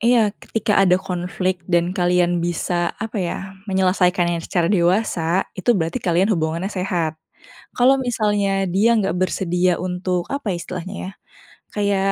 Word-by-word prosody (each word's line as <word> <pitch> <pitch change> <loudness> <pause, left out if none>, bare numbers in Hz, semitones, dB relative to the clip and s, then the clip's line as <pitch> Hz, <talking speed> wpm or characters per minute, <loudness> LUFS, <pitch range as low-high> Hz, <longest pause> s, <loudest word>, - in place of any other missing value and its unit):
Iya, 230 -3 +3
ketika 215 -2 0
ada 180 -2 +5
konflik 180 0 -2
dan 175 0 +2
kalian 175 -2 +2
bisa, 175 0 -1
apa 220 -1 -4
ya, 175 - -2 0.3
menyelesaikannya 180 -2 +2
secara 170 +1 -1
dewasa, 175 -1 +1
itu 225 +5 +1
berarti 165 -2 -2
kalian 185 +4 +2
hubungannya 165 +3 -1
sehat. 170 -4 -2 0.6
Kalau 260 +2 +5
misalnya 205 -5 0
dia 215 +6 +3
nggak 195 -4 0
bersedia 180 -1 +1
untuk, 180 -1 -2
apa 280 -8 -2
ya 175 - -2
istilahnya 180 +3 -6
ya, 185 - -5 0.7
kayak 200 -1 +1
185 Hz, 140 wpm, -21 LUFS, 175-200 Hz, 0.7 s, ada